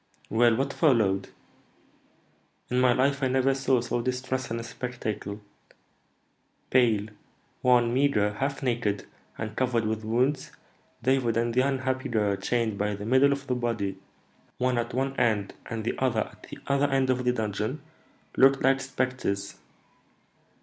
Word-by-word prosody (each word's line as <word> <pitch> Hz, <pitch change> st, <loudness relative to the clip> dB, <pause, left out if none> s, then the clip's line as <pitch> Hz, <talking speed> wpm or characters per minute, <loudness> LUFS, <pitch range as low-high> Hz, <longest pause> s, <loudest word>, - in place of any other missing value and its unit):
"Well, 115 Hz, +1 st, +4 dB
what 135 Hz, +3 st, -1 dB
followed?" 110 Hz, -, +2 dB, 1.4 s
"In 125 Hz, -, +2 dB
my 125 Hz, -1 st, +5 dB
life 140 Hz, +3 st, +1 dB
I 135 Hz, -, +2 dB
never 130 Hz, +1 st, +2 dB
saw 135 Hz, -2 st, +1 dB
so 120 Hz, 0 st, -2 dB
distressing 125 Hz, -1 st, -2 dB
a -, -, -5 dB
spectacle. 110 Hz, -4 st, -5 dB, 1.3 s
Pale, 110 Hz, -5 st, +3 dB, 0.5 s
wan, 120 Hz, -2 st, +4 dB
meagre, 125 Hz, -7 st, +2 dB
half 135 Hz, +6 st, -3 dB
naked, 115 Hz, -6 st, -1 dB, 0.3 s
and 110 Hz, 0 st, -5 dB
covered 120 Hz, -3 st, +1 dB
with 110 Hz, 0 st, -2 dB
wounds, 125 Hz, +5 st, 0 dB, 0.5 s
David 125 Hz, -3 st, +2 dB
and 115 Hz, 0 st, 0 dB
the 130 Hz, -, +4 dB
unhappy 130 Hz, -1 st, -1 dB
girl, 105 Hz, -4 st, +1 dB
chained 110 Hz, -1 st, -1 dB
by 105 Hz, 0 st, 0 dB
the 105 Hz, +1 st, -7 dB
middle 130 Hz, +4 st, +4 dB
of 140 Hz, 0 st, -2 dB
the 130 Hz, -, -1 dB
body, 110 Hz, -6 st, -2 dB, 0.6 s
one 125 Hz, -1 st, +1 dB
at 120 Hz, 0 st, -3 dB
one 135 Hz, +1 st, -1 dB
end 105 Hz, -4 st, +1 dB
and 115 Hz, -1 st, -4 dB
the 115 Hz, -, -1 dB
other 125 Hz, -4 st, +1 dB
at -, -, -8 dB
the -, -, -8 dB
other 140 Hz, +1 st, +2 dB
end 135 Hz, -1 st, +2 dB
of 125 Hz, 0 st, -1 dB
the 125 Hz, -, +3 dB
dungeon, 110 Hz, +4 st, -3 dB, 0.5 s
looked 135 Hz, 0 st, +5 dB
like 135 Hz, +1 st, +3 dB
spectres. 130 Hz, -8 st, -2 dB
125 Hz, 150 wpm, -27 LUFS, 110-130 Hz, 1.4 s, my